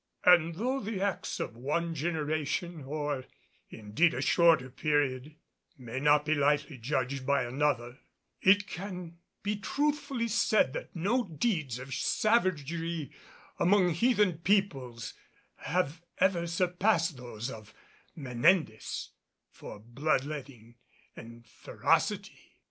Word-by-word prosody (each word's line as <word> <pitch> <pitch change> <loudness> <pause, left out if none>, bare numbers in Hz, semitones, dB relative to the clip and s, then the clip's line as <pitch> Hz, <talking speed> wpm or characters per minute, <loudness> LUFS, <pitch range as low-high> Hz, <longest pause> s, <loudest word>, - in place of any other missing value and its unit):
And 170 -2 +5
though 255 +8 -1
the 210 -4 -4
acts 195 -1 -2
of - - -4
one 150 +7 -2
generation, 155 +1 -2
or 145 -2 -3 0.4
indeed 110 +11 +1
a 125 - -2
shorter 160 -6 +4
period, 145 0 0 0.4
may 125 -1 -6
not 150 +1 +4
be 155 - +2
lightly 145 -1 +1
judged 130 +1 -2
by 140 +1 +2
another, 125 -1 -1 0.4
it 200 +2 +5
can 180 -3 -7 0.2
be 205 +1 -1
truthfully 285 +1 -1
said 215 - +2
that - - -7
no 220 +9 +1
deeds 160 - -1
of 130 +1 -7
savagery 170 - 0 0.5
among 180 0 +4
heathen 205 -2 +2
peoples 135 - 0 0.4
have 175 -3 -1 0.2
ever 175 -3 +2
surpassed 175 -1 +1
those 120 0 -6
of 110 -2 -11 0.4
Menendez 135 -1 0 0.4
for - - -10
blood 130 +6 -1
letting 130 -6 -8 0.4
and 115 +1 -12
ferocity. 110 - -1
155 Hz, 115 wpm, -30 LUFS, 130-185 Hz, 0.5 s, And